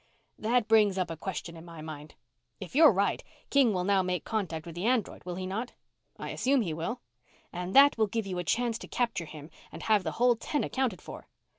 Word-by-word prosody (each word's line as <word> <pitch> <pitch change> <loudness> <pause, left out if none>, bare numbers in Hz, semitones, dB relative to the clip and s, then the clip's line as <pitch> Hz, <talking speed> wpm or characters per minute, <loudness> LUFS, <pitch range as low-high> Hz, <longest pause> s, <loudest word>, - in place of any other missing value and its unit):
"That 235 +1 +1
brings 210 -3 +4
up 185 -3 -1
a - - -4
question 170 0 -5
in 165 - -11
my 170 -2 -11
mind. 155 -1 -9 0.4
If 190 - -9
you're 310 -1 +8
right, 200 0 0 0.3
King 275 -5 +5
will 180 -3 -1
now 195 0 +3
make 180 -2 -2
contact 170 -8 -3
with 170 - -8
the 175 +6 -2
android, 245 -4 0
will 180 -1 -4
he 185 +1 -4
not?" 215 +6 -4 0.4
"I - - -6
assume 270 0 +2
he 170 -5 -3
will." 170 +10 -4 0.5
"And 180 +2 -4
that 280 -3 +7
will 220 - +4
give 225 +1 -2
you 185 -2 -3
a - - -2
chance 235 +5 0
to - - -9
capture 235 -8 -1
him 155 0 -11 0.2
and - - -9
have 215 -3 +3
the - - -3
whole 245 +1 +3
ten 285 +6 -2
accounted 255 -8 -2
for?" - - -10
195 Hz, 225 wpm, -29 LUFS, 175-235 Hz, 0.5 s, you're